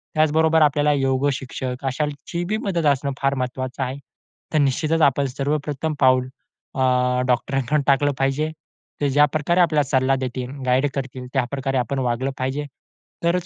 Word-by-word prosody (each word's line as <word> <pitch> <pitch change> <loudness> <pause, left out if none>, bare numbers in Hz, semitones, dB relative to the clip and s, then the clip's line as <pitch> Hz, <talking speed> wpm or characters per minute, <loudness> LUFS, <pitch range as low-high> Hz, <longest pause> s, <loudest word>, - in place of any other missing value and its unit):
त्याचबरोबर 160 +1 +3
आपल्याला 150 0 +3
योग 135 0 +1
शिक्षक 130 0 -5
अशांची 150 +5 -3 0.2
मदत 175 -5 0
असणं 140 0 +1
फार 140 0 +2
महत्त्वाचं 130 +1 -3
आहे. 130 +2 -4 0.6
तर 155 - +3
निश्चितच 155 +4 +1
आपण 140 -1 +3
सर्वप्रथम 145 +3 -2
पाऊल, 130 -1 +4 0.5
अ, 125 -1 +2
डॉक्टरांकडून 135 +3 +1
टाकलं 145 +1 +3
पाहिजे. 135 +3 0 0.5
ते 145 - +2
ज्या 145 +2 +4
प्रकारे 170 +4 +2
आपल्याला 155 -4 +3
सल्ला 135 -1 +3
देतील, 130 -1 -4 0.2
गाईड 130 +3 +3
करतील, 130 -2 -5
त्याप्रकारे 135 +1 -1
आपण 135 +2 -1
वागलं 125 +2 -1
पाहिजे. 135 +3 -2 0.6
तरच 175 +1 +1
135 Hz, 145 wpm, -22 LUFS, 130-150 Hz, 0.6 s, पाऊल